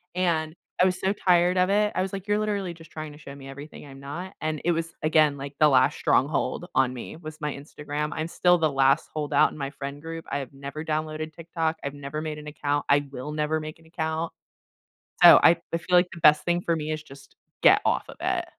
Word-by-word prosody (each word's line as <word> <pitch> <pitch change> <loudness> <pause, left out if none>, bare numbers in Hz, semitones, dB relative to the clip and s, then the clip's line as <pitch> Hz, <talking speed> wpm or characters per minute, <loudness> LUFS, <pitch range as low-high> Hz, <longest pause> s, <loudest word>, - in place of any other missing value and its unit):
and 165 -3 0 0.3
I - - +6
was 185 0 0
so 190 +2 +1
tired 180 -2 +3
of 180 +1 +3
it. 210 +1 +2
I - - 0
was 190 0 -2
like, 195 0 -6
"You're 205 +1 +2
literally 200 -4 -2
just 165 -1 -15
trying 155 -1 -7
to 145 - -13
show 140 -2 -10
me 135 -1 -11
everything 145 +3 -10
I'm 135 -1 -12
not," 165 +7 -7
and 155 -1 -2
it 175 - +3
was, 165 0 -3
again, 155 -2 +3
like, 140 +1 -7
the 150 - +6
last 130 -2 +3
stronghold 145 +5 +1
on 130 -1 +2
me 120 - -7
was 155 -2 -10
my 150 -2 -3
Instagram. 150 +1 -5
I'm 155 +2 -3
still 180 +1 +3
the 160 -3 +1
last 135 +3 +2
holdout 150 -2 +2
in - - -11
my 140 -2 -3
friend 140 0 -7
group. 165 0 -7
I 145 - 0
have 135 -3 -7
never 140 +3 -7
downloaded 155 0 -3
TikTok, 165 0 -3
I've 140 - -4
never 145 +1 -6
made 155 -1 -5
an 150 - -11
account, 145 -1 -2
I 145 0 +3
will 135 +2 -6
never 155 +1 0
make 155 0 -7
an 165 - -22
account. 160 0 -3 0.9
So, - - +11
I 170 - +6 0.2
I - - +2
feel 180 +2 0
like 180 0 +3
the 170 - -9
best 150 0 +6
thing 175 0 +1
for 170 -1 0
me 155 -1 -3
is 155 0 -3
just 140 -1 -16 0.3
get - - +7
off - - +1
of - - -11
it. - - 0
155 Hz, 240 wpm, -26 LUFS, 145-170 Hz, 0.9 s, So